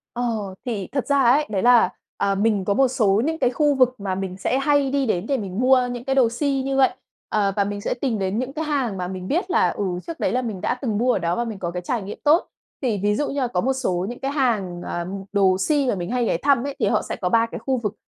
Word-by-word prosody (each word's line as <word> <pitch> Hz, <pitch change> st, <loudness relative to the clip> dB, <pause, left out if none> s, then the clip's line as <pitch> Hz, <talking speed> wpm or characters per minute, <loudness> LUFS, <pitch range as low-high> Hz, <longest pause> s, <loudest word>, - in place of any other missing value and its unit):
Ờ, 225 Hz, -5 st, -2 dB
thì 210 Hz, -6 st, -3 dB
thật 275 Hz, -1 st, -1 dB
ra 280 Hz, -1 st, +3 dB
ấy, 270 Hz, +5 st, +4 dB
đấy 195 Hz, -3 st, -1 dB
là, 245 Hz, -1 st, +5 dB, 0.3 s
ờ, 200 Hz, -, +1 dB
mình 205 Hz, -1 st, +1 dB
có 200 Hz, -, +1 dB
một 265 Hz, +4 st, +4 dB
số 215 Hz, -4 st, +2 dB
những 320 Hz, +2 st, -1 dB
cái 245 Hz, -, +2 dB
khu 290 Hz, +3 st, +2 dB
vực 255 Hz, -2 st, +3 dB
mà 195 Hz, -2 st, -2 dB
mình 185 Hz, -1 st, -4 dB
sẽ 225 Hz, +7 st, 0 dB
hay 280 Hz, 0 st, +2 dB
đi 275 Hz, -1 st, 0 dB
đến 180 Hz, -6 st, -1 dB
để 280 Hz, -, +1 dB
mình 200 Hz, -3 st, -4 dB
mua 255 Hz, -1 st, +4 dB
những 245 Hz, -1 st, -6 dB
cái 270 Hz, 0 st, 0 dB
đồ 260 Hz, -4 st, +4 dB
si 270 Hz, +3 st, -1 dB
như 270 Hz, 0 st, -1 dB
vậy. 270 Hz, -1 st, +5 dB, 0.4 s
Ờ, 200 Hz, -2 st, +1 dB
và 200 Hz, -, +2 dB
mình 205 Hz, 0 st, -4 dB
sẽ -, -, -2 dB
tìm 245 Hz, -6 st, 0 dB
đến 195 Hz, +2 st, -1 dB
những 255 Hz, +2 st, -3 dB
cái 315 Hz, +2 st, -3 dB
hàng 270 Hz, -9 st, -1 dB
mà 180 Hz, -1 st, -3 dB
mình 185 Hz, 0 st, -6 dB
biết 350 Hz, +5 st, -1 dB
là, 250 Hz, -, +3 dB
ừ, 205 Hz, -, -3 dB, 0.2 s
trước 335 Hz, -1 st, -7 dB
đấy 185 Hz, -, +1 dB
là 255 Hz, +2 st, 0 dB
mình 215 Hz, -6 st, -4 dB
đã -, -, 0 dB
từng 220 Hz, -6 st, -1 dB
mua 250 Hz, +2 st, +3 dB
ở -, -, +1 dB
đó 170 Hz, -1 st, -1 dB
và 240 Hz, -, 0 dB
mình 220 Hz, -4 st, -6 dB
có 175 Hz, -2 st, -3 dB
cái 180 Hz, +1 st, -5 dB
trải 225 Hz, +5 st, -2 dB
nghiệm 195 Hz, +2 st, -7 dB
tốt. 310 Hz, +4 st, +4 dB, 0.3 s
Thì 230 Hz, -6 st, 0 dB
ví 205 Hz, 0 st, +2 dB
dụ 295 Hz, +7 st, -1 dB
như 280 Hz, -, -2 dB
là 255 Hz, -, +1 dB
có 180 Hz, -6 st, 0 dB
một 265 Hz, +6 st, +1 dB
số 190 Hz, -9 st, -1 dB
những 240 Hz, +2 st, -7 dB
cái 270 Hz, -, -2 dB
hàng, 215 Hz, -11 st, 0 dB
ừm, 185 Hz, +3 st, -5 dB
đồ 195 Hz, -2 st, +3 dB
si 285 Hz, +7 st, +1 dB
mà -, -, +2 dB
mình 175 Hz, -2 st, -4 dB
hay 245 Hz, -1 st, 0 dB
ghé 225 Hz, -, +1 dB
thăm 275 Hz, -3 st, +3 dB
ấy, 280 Hz, -1 st, -4 dB
thì -, -, +2 dB
họ -, -, +2 dB
sẽ -, -, -5 dB
có 180 Hz, -, -1 dB
3 230 Hz, +4 st, +3 dB
cái -, -, -7 dB
khu 265 Hz, -1 st, +2 dB
vực, 210 Hz, -4 st, -3 dB
235 Hz, 295 wpm, -22 LUFS, 195-270 Hz, 0.4 s, là